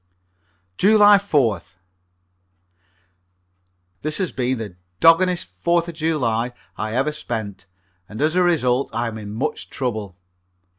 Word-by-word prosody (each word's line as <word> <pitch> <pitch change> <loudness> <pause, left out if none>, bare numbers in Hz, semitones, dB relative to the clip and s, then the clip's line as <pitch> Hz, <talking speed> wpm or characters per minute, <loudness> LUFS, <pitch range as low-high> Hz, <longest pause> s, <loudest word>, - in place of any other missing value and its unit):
July 205 0 +6
4th. 115 - 0 2.3
This 155 0 -2
has 185 -3 -1
been 130 0 -1
the 105 -5 -7 0.2
doggonest 175 - +4
Fourth 170 - +1
of 170 - -6
July 125 -7 -1 0.2
I 110 +1 -4
ever 135 +4 +1
spent, 110 -10 -6 0.4
and 110 - -8
as 155 +2 +2
a 180 - +3
result 140 -7 +2
I 120 +1 0
am 110 -1 -7
in 105 -1 -8
much 135 +8 -3
trouble. 110 -8 -4
130 Hz, 120 wpm, -21 LUFS, 110-165 Hz, 2.3 s, July